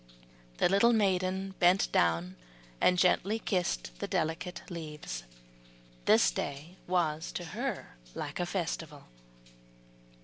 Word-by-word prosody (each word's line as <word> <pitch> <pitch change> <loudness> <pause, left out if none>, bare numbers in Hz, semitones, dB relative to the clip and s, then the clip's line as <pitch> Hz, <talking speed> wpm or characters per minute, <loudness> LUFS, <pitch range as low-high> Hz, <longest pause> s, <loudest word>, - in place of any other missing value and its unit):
The - - +4
little 200 +6 +4
maiden 190 -2 +1
bent 180 +2 +4
down 85 +2 +2 0.5
and 180 - +4
gently 190 +4 +3
kissed 180 - -1
the - - -3
delicate 180 +3 -2
leaves. 150 - -6 0.8
This - - +5
day 145 - -5
was 165 -3 0
to 175 - -4
her 150 - -4 0.2
like - - -5
a 175 - 0
festival. 165 -5 -3
175 Hz, 110 wpm, -31 LUFS, 150-185 Hz, 0.8 s, This